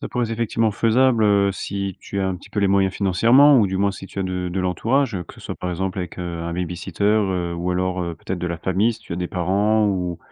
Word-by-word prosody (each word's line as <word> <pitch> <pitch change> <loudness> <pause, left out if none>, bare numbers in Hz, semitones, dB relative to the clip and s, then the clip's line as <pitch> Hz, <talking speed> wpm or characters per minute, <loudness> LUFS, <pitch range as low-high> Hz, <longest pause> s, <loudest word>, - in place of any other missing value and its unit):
Ça - - -5
pourrait 120 -1 -1
c'est 115 - -4
effectivement, 115 -1 0
faisable, 115 +2 +3
heu, 100 -1 +3
si 100 0 -4
tu 100 - -5
as 95 - 0
un 95 - -2
petit 90 - -15
peu - - -4
les 100 - +3
moyens 95 -1 +2
financièrement 115 +10 +5
ou 105 - +4
du 95 0 -2
moins, 100 +1 +1
si 95 - -9
tu 100 - -10
as - - +1
de 90 -1 -3
de 95 - -1
l'entourage, 115 +8 0
heu, 90 - -3
que - - -13
ce - - -15
soit, - - -6
par 90 - -4
exemple, 95 +2 -3
avec, 90 -1 -5
heu, 85 -2 -4
un 85 0 -4
babysitter, 90 +2 -5
heu, 95 -5 +1
ou 85 +1 -2
alors, 90 0 -1
heu, 85 -1 -4
peut-être 95 - -5
de 90 - -3
la 85 -1 -3
famille, 95 +6 +1
si 115 - -12
tu 105 - -9
as - - -3
des 90 -1 -3
parents 100 +4 +1
ou 90 -4 -1
95 Hz, 280 wpm, -22 LUFS, 90-105 Hz, -, financièrement